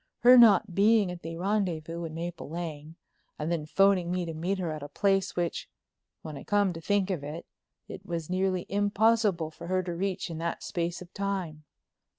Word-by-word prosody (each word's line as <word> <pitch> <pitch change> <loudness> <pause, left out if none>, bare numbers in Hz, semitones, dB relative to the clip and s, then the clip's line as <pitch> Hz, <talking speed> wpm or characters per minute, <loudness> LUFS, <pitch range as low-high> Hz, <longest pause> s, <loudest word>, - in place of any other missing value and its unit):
Her 245 +1 +8
not 220 -5 +6
being 205 0 +4
at 175 -1 -8
the 165 +1 -6
rendezvous 170 -4 -1
in 160 -1 -7
Maple 170 -2 -5
Lane 160 -2 -6 0.4
and 155 +2 -3
then 155 -3 -2
phoning 195 0 +3
me 180 0 -1
to 165 - -5
meet 175 +5 -2
her 175 -4 -2
at 155 -1 -5
a 145 - -6
place, 195 +4 +1
which, 175 -1 -2 0.5
when 155 -2 -7
I - - -9
came 205 -3 +2
to 165 - -8
think 200 +2 +1
of 170 -6 -3
it, 150 +4 -6 0.4
it 190 - -9
was 170 -4 -4
nearly 185 0 0
impossible 205 -4 +2
for 170 - -10
her 185 +1 0
to 175 -1 -4
reach 185 0 -2
in 160 - -5
that 170 0 -3
space 170 0 -3
of 175 - -19
time. 185 -6 -3
175 Hz, 195 wpm, -28 LUFS, 165-195 Hz, 0.5 s, Her